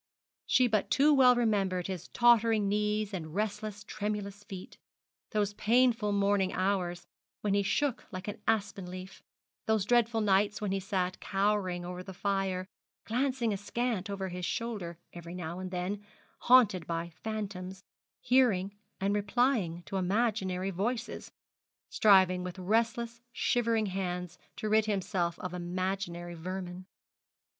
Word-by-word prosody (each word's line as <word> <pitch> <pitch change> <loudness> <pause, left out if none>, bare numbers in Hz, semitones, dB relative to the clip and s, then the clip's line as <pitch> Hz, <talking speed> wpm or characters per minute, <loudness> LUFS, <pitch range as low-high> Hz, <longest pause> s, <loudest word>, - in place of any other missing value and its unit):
She 255 - +5
but 215 -4 +1
too 285 +9 +5
well 255 -3 +7
remembered 195 -6 +1
his 185 -3 -5
tottering 230 -3 +4
knees, 210 0 0
and 160 -3 -5
restless, 210 0 -3
tremulous 205 -1 -4
feet: 190 -4 -9 0.5
those 205 -1 0
painful 230 0 +3
morning 200 -1 +2
hours 185 -2 -1 0.4
when 205 -2 0
he 200 - +3
shook 255 +6 0
like 185 0 -6
an 205 - -5
aspen 200 -4 0
leaf: 185 +1 -9 0.5
those 220 -3 +2
dreadful 235 0 +3
nights, 205 0 +2
when 210 -2 -2
he 195 - 0
sat 185 -2 -2
cowering 195 -3 0
over 180 0 -5
the 190 0 -9
fire, 195 -1 -1 0.4
glancing 250 -1 0
askant 205 0 -2
over 195 -1 -3
his 180 0 -6
shoulder 200 -5 -3 0.2
every 170 0 -8
now 175 0 -5
and 185 0 -5
then, 185 +3 -3 0.4
haunted 215 -9 +5
by 170 0 -3
phantoms, 190 -4 -5 0.4
hearing 205 -7 +3 0.2
and 195 +1 +1
replying 205 -5 +1
to 180 +5 -4
imaginary 190 -1 0
voices, 230 +6 -3 0.6
striving 190 -3 +5
with 180 0 -6
restless, 230 +4 0
shivering 230 -2 +1
hands 180 -2 -3 0.2
to 215 - -4
rid 215 0 +3
himself 190 -4 -1
of 180 -1 -5
imaginary 175 -1 -3
vermin. 180 +1 -6
200 Hz, 135 wpm, -31 LUFS, 185-220 Hz, 0.6 s, well